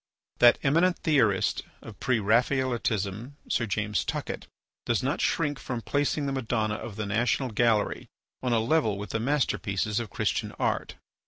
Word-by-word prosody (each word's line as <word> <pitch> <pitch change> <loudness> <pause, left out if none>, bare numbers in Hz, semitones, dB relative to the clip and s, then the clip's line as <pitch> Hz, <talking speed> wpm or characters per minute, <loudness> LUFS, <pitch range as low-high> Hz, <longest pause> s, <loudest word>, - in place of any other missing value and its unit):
That 120 0 +7
eminent 165 +6 +3
theorist 120 - +2 0.2
of - - -11
Pre 125 -2 +1
Raphaelitism, 115 -1 0
Sir 120 - 0
James 105 0 -1
Tuckett, - - -4 0.4
does - - +1
not - - -1
shrink 145 -2 0
from 120 -3 -5
placing 145 +1 0
the 140 - -1
Madonna 115 -5 -1
of 105 -1 -6
the 110 - -3
National 115 +5 0
Gallery 110 -2 +1 0.3
on 125 - -1
a 115 - +3
level 115 -3 +1
with 105 +1 -6
the 115 - -1
masterpieces 110 -5 0
of 115 -3 -5
Christian - - -1
art. - - -2
120 Hz, 155 wpm, -27 LUFS, 105-135 Hz, 0.4 s, That